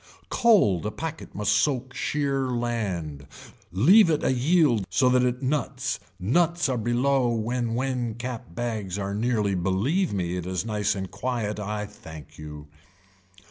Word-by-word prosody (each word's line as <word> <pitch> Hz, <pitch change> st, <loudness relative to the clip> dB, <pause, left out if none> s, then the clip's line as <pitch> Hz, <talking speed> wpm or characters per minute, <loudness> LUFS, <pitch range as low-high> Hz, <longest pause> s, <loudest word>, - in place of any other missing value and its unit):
Cold 200 Hz, -, +4 dB
a -, -, 0 dB
packet 160 Hz, +7 st, -6 dB
must 105 Hz, -, 0 dB
soak 130 Hz, +4 st, +1 dB
sheer 140 Hz, -3 st, -1 dB
land, 100 Hz, -, -3 dB, 0.4 s
leave 170 Hz, -, +6 dB
it 155 Hz, -2 st, +1 dB
a -, -, +2 dB
yield 130 Hz, -, +3 dB
so 125 Hz, +8 st, +3 dB
that 125 Hz, 0 st, +2 dB
nuts 130 Hz, -3 st, -1 dB, 0.2 s
nuts 165 Hz, -, +2 dB
are 130 Hz, -, 0 dB
below 125 Hz, +3 st, +2 dB
when 115 Hz, +1 st, -1 dB
when 125 Hz, -3 st, -1 dB
cap 120 Hz, -8 st, -6 dB
bags 110 Hz, -5 st, -3 dB
are 100 Hz, 0 st, -3 dB
nearly 105 Hz, -2 st, 0 dB
believe 100 Hz, -, 0 dB
me 90 Hz, -2 st, -2 dB
it 90 Hz, -1 st, -5 dB
is 95 Hz, +3 st, -2 dB
nice 105 Hz, -2 st, 0 dB
and 95 Hz, -1 st, -5 dB
quiet 115 Hz, -5 st, -3 dB
I 105 Hz, 0 st, -3 dB
thank 80 Hz, -8 st, -12 dB
you. 75 Hz, -1 st, -9 dB
120 Hz, 145 wpm, -26 LUFS, 100-130 Hz, 0.4 s, leave